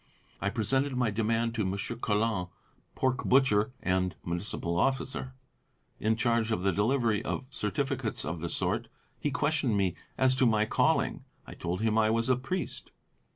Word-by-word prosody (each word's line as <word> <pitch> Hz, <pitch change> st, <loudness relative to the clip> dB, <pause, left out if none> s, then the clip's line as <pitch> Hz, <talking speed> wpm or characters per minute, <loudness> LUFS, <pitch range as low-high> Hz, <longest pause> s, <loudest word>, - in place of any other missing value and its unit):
I 100 Hz, -, +1 dB
presented 130 Hz, +5 st, 0 dB
my 120 Hz, -3 st, +2 dB
demand 115 Hz, +2 st, 0 dB
to 115 Hz, -2 st, 0 dB
Monsieur 100 Hz, +4 st, -2 dB
Colin, 105 Hz, -4 st, 0 dB, 0.5 s
pork 130 Hz, 0 st, 0 dB
butcher 125 Hz, -4 st, +4 dB
and 90 Hz, 0 st, +1 dB
Municipal 85 Hz, 0 st, -2 dB
officer, 130 Hz, 0 st, -1 dB, 0.6 s
in 110 Hz, +1 st, +2 dB
charge 115 Hz, -1 st, +1 dB
of 95 Hz, -5 st, 0 dB
the 95 Hz, -, +3 dB
delivery 115 Hz, +2 st, +1 dB
of 135 Hz, -, -3 dB
certificates 105 Hz, -7 st, -2 dB
of 80 Hz, +2 st, -3 dB
the 85 Hz, +1 st, -3 dB
sort. -, -, -1 dB, 0.3 s
He 145 Hz, -, 0 dB
questioned 145 Hz, -5 st, +1 dB
me 95 Hz, -3 st, +2 dB, 0.2 s
as 130 Hz, 0 st, +4 dB
to 130 Hz, -2 st, +4 dB
my 110 Hz, -1 st, +3 dB
calling. -, -, +1 dB, 0.2 s
I -, -, -9 dB
told 90 Hz, +3 st, -3 dB
him 110 Hz, 0 st, +2 dB
I 110 Hz, 0 st, +4 dB
was 115 Hz, +2 st, +1 dB
a 130 Hz, -, +5 dB
Priest. 180 Hz, +8 st, -4 dB
110 Hz, 160 wpm, -30 LUFS, 100-130 Hz, 0.6 s, a